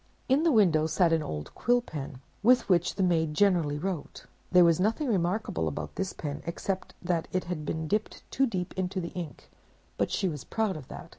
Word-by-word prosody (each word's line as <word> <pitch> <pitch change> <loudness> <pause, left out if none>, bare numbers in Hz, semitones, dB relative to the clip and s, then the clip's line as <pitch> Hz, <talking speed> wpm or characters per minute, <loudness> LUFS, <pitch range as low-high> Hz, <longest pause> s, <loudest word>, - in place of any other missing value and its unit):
"In 265 +3 +4
the 330 0 +3
window 170 - +4
sat 165 +1 +3
an 160 - +2
old 75 - -5
Quill 245 +1 +2
Pen, 140 - -7 0.2
with 250 +4 +4
which 175 -3 +2
the 195 - +1
maid 160 -4 +1
generally 170 -6 +3
wrote: 180 -1 -4 0.3
there 180 -1 +7
was 170 -1 +4
nothing 225 +9 +1
remarkable 180 - 0
about 75 0 -4
this 190 -1 -2
pen, 145 -2 -5
except 185 +2 -3
that 175 -2 0
it 185 - 0
had 170 -4 -5
been 160 0 -2
dipped 210 +5 -2
too 270 0 +2
deep 185 -6 -3
into 185 0 -2
the 170 -1 -4
ink, 165 -7 -8 0.5
but - - +2
she 190 - 0
was 150 -6 -4
proud 220 -3 -1
of 150 -5 -8
that. - - -9
180 Hz, 205 wpm, -29 LUFS, 155-195 Hz, 0.5 s, there